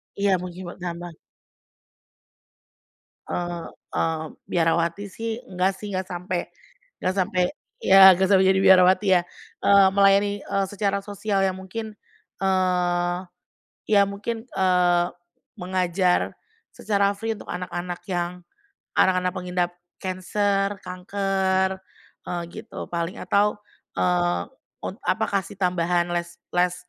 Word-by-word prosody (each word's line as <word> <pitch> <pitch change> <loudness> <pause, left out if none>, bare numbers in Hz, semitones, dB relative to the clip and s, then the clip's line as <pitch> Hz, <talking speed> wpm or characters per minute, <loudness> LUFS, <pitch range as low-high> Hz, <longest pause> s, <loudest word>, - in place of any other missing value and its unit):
Iya, 200 -1 +2
mungkin 180 0 -7
bertambah. 175 -2 -7 2.1
Eee 175 -1 -3 0.3
eee, 160 -1 0 0.3
biarawati 170 +3 +1
sih 225 +3 -4
nggak 185 +1 +2
sih, 205 +2 -7
nggak 185 -1 -3
sampai 180 0 -3 0.6
nggak 185 - +2
sampai, 185 -1 +1 0.4
ya 190 -1 +9
nggak 190 +1 +2
sampai 190 -1 +5
jadi 190 0 +4
biarawati 190 +1 +6
ya. - - -1 0.4
Eee, 200 -1 +6
melayani, 200 +1 +5
eee, 195 -1 0
secara 200 -1 0
sosial 200 -1 -1
yang 190 -1 +1
mungkin, 220 +4 -6 0.5
eee, 180 -2 +1 0.7
ya 205 -2 +6
mungkin 225 +4 -5
eee, 180 -2 +3 0.5
mengajar 180 0 0 0.3
secara 200 -1 +1
free 225 +2 -2
untuk - - -12
anak-anak 180 0 -4
yang 175 -1 -1 0.7
anak-anak 185 -1 +3
pengidap 180 -1 -1 0.3
cancer, 195 +2 0
kanker, 190 0 0 0.5
eee, 175 -1 -3
gitu 220 +5 -8
paling 170 +1 -3
atau, 205 +3 +1 0.4
eee, 90 -1 +1 0.4
un - - -5
apa - - +1
kasih 195 +1 -3
tambahan 175 -1 +1
les 170 0 -5 0.2
les, 180 0 +3
185 Hz, 115 wpm, -24 LUFS, 175-195 Hz, 2.1 s, ya